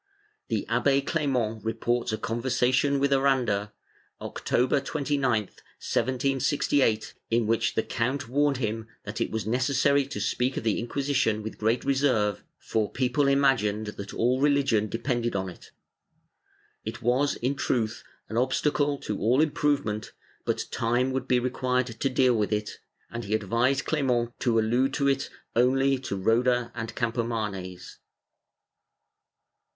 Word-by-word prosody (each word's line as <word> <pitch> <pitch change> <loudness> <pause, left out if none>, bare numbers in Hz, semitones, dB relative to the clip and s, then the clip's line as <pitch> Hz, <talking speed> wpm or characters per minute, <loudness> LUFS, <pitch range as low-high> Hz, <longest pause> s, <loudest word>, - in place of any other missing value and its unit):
The - - -2
Abbe 140 -1 +2
Clement 125 -9 -1
reports 115 +2 -1
a 110 - -1
conver 115 +4 -3
sation 130 +3 +2
with 140 0 +2
Aranda, 125 -7 +1 0.5
October 125 +3 0
29, 140 -5 0
1768, 130 +1 0 0.2
in 115 0 +2
which 115 +1 +1
the 110 - +1
count 130 +3 -2
warned 140 +2 +2
him 115 -2 -3 0.2
that 105 +2 -5
it - - 0
was 110 -1 -3
necessary 135 +4 +2
to 140 - -5
speak 125 +2 0
of - - -2
the 110 -2 +1
Inquisition 125 -3 0
with 110 - -7
great 110 +3 +1
reserve, 130 -8 +1
for 110 -2 -1
people 130 +2 +1
imagined 135 -7 +2
that 100 -1 -7
all 125 +3 +1
religion 140 -7 +2
depended 120 -1 -1
on 95 -1 -1
it; 90 - -13 1.1
it 115 +3 -6
was, 130 +4 +2
in 130 +3 -1
truth, 115 -5 -1 0.2
an 110 - -4
obstacle 145 +3 +1
to 105 - -3
all 120 +5 +3
improvement, 145 -8 0 0.3
but - - -1
time 120 +3 +1
would 130 0 -2
be 125 - +3
required 125 0 0
to 135 - +1
deal 130 -1 +3
with 105 -2 0
it, 105 0 -2 0.3
and 120 0 -5
he 105 +2 0
advised 120 +6 +1
Clement 125 -6 +1
to 120 -3 +1
allude 120 +4 +2
to 140 - +1
it 135 0 +1 0.3
only 135 +3 +3
to 125 -6 -4
Roda 120 +4 +2
and 115 -1 -5
Campomanes. 110 -6 -3
125 Hz, 140 wpm, -27 LUFS, 110-135 Hz, 1.1 s, all